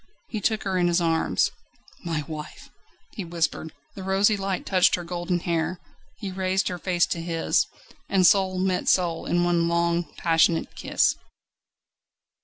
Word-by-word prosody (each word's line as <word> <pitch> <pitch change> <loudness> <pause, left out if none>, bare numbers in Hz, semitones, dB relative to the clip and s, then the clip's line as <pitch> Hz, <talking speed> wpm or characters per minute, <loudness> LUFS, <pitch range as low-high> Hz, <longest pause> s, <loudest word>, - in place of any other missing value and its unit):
He 215 - -4
took 220 +1 0
her 190 -2 -1
in 175 - +3
his 175 0 +2
arms. 165 -1 +1 0.5
"My 165 -3 -2
wife!" 155 -1 -8 0.4
he 205 - -5
whispered. 165 -2 -2 0.2
The 195 - -8
rosy 195 +3 +3
light 195 -2 -3
touched 185 -2 +4
her 175 - -6
golden 175 0 -2
hair; 170 +1 -1 0.4
he 200 -3 -5
raised 190 +1 0
her 180 -1 -5
face 175 -1 +1
to 170 - -3
his, 165 -1 +1 0.4
and 190 -2 +3
soul 190 -1 +4
met 185 -1 0
soul 175 -3 +1
in 175 0 +2
one 170 -1 +2
long, 170 0 0
passionate 165 0 +2
kiss. - - +1
175 Hz, 155 wpm, -25 LUFS, 170-190 Hz, 0.5 s, touched